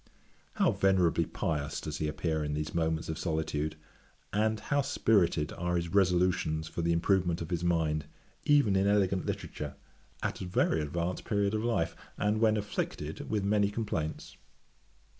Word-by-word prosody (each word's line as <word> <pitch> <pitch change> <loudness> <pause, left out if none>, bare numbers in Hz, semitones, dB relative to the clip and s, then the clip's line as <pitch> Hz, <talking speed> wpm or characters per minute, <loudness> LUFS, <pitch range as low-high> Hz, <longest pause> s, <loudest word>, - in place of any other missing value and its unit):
How - - +3
venerably 90 -4 +2
pious 75 -2 -2
does 75 -1 -5
he 75 - 0
appear 80 0 -1
in 75 0 -2
these 75 0 -3
moments 80 -1 0
of 80 - -4
solitude, 80 -2 -1 0.6
and 110 +1 +1
how 145 +5 +1
spirited 90 - +2
are 90 0 -1
his 85 -1 -1
resolutions 90 -4 +2
for 85 - -4
the 85 0 +1
improvement 85 0 +2
of 85 +2 -6
his 85 -1 -1
mind, 80 -3 +1 0.4
even 145 -9 +4
in 95 +1 +3
elegant 95 -2 +2
literature, - - -4 0.5
at - - -2
a - - -3
very 80 -3 +2
advanced 85 +4 -2
period 100 -1 0
of 110 0 0
life, 115 -9 0 0.2
and 105 +1 +1
when 110 -1 +4
afflicted 105 0 -4
with 105 -2 0
many 100 0 +3
complaints. 100 -8 -3
85 Hz, 160 wpm, -30 LUFS, 80-100 Hz, 0.6 s, even